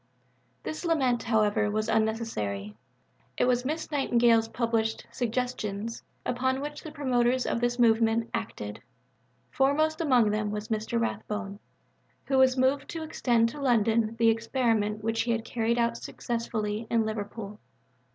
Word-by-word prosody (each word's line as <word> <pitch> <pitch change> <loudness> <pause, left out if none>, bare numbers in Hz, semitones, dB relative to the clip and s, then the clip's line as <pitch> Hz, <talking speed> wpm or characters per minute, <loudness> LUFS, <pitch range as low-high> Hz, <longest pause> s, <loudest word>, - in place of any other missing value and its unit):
This 310 - -5
lament, 270 -8 +2
however, 215 -2 +2
was 215 +1 -1
unnecessary. 215 - -1 0.6
It - - +3
was 250 0 +2
Miss 315 +3 -3
Nightingale's 235 -5 +3
published 225 -1 -1
Suggestions 230 -3 -3 0.2
upon 260 +2 0
which 295 +1 -5
the 315 - -8
promoters 255 -3 +1
of 235 - -1
the 240 0 +1
movement 225 -1 +3
acted. 160 - -5 0.7
Foremost 310 +4 +2
among 250 -9 +4
them 210 0 -1
was 210 +1 -5
Mr. 220 +1 -1
Rathbone, 210 -2 -3 0.7
who 265 -1 +2
was 260 0 +5
moved 260 +2 +1
to 325 -1 -4
extend 235 -7 +2
to 290 +4 -8
London 230 -3 +2
the 230 0 +5
experiment 225 -2 0
which 225 0 0
he 235 - 0
had 225 0 -3
carried 235 0 0
out 235 0 +1
successfully 225 -2 -3
in 230 -1 +2
Liverpool. 210 -1 -5
230 Hz, 140 wpm, -28 LUFS, 220-255 Hz, 0.7 s, was